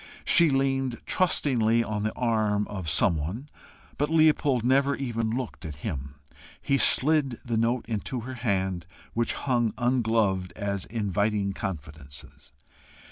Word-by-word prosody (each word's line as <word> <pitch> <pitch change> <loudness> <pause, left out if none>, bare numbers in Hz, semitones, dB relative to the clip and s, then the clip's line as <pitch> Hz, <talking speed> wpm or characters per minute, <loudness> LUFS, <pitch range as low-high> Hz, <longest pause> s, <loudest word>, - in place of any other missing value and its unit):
She 170 -4 +5
leaned 135 -2 0
trustingly 120 -10 +2
on 105 -2 -3
the 110 +1 -2
arm 110 -4 0
of 95 -6 -4
some 85 - +3
one, 100 - -5 0.5
but 145 +1 +1
Leopold 150 -6 +3
never 140 +2 +3
even 115 -4 -2
looked 125 +1 -4
at 75 -2 -6
him. 70 -8 -5 0.4
He 140 0 0
slid 140 -4 +4
the 120 -2 -2
note 115 +2 0
into 115 +3 -3
her 130 +3 -7
hand, 95 -7 -2 0.3
which 115 0 0
hung 120 -5 0
ungloved 110 -7 +1
as 100 -2 -3
inviting 105 -2 -1
confidences. 75 -7 -8
115 Hz, 135 wpm, -26 LUFS, 100-130 Hz, 0.5 s, She